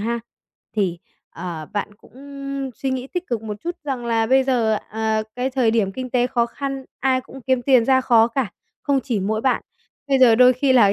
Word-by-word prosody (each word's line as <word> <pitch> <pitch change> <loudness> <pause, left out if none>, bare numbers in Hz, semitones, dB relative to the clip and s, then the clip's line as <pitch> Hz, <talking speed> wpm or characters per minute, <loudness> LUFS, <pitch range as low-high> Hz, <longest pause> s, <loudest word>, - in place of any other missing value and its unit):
ha, 235 +2 -1 0.6
thì, 185 -5 0 0.3
ờ, 165 -3 -6
bạn 205 0 -3
cũng 205 - -22 0.6
suy 270 - -3
nghĩ 260 -1 -3
tích 360 +5 -4
cực 235 -3 -2
một 210 -2 -5
chút 345 +1 -3
rằng 260 -4 -3
là 225 -1 +1
bây 265 +3 +4
giờ, 230 -5 +2
ờ, 220 0 0
cái 255 +2 -1
thời 255 -4 +2
điểm 215 -4 +1
kinh 255 +3 -6
tế 245 -1 +2
khó 240 -2 +1
khăn, 275 +2 -5 0.2
ai 260 -1 +2
cũng 270 +1 -12
kiếm 260 0 0
tiền 255 -3 +4
ra 260 +1 +4
khó 235 -3 +4
cả, 240 -3 -2 0.3
không 280 -2 +1
chỉ 230 -6 -1
mỗi 215 +3 -1
bạn, 260 +2 +1 0.5
bây 270 -1 +3
giờ 250 -3 +7
đôi 250 +2 +7
khi 260 +2 +2
là 220 -6 +6
245 Hz, 215 wpm, -21 LUFS, 220-260 Hz, 0.6 s, giờ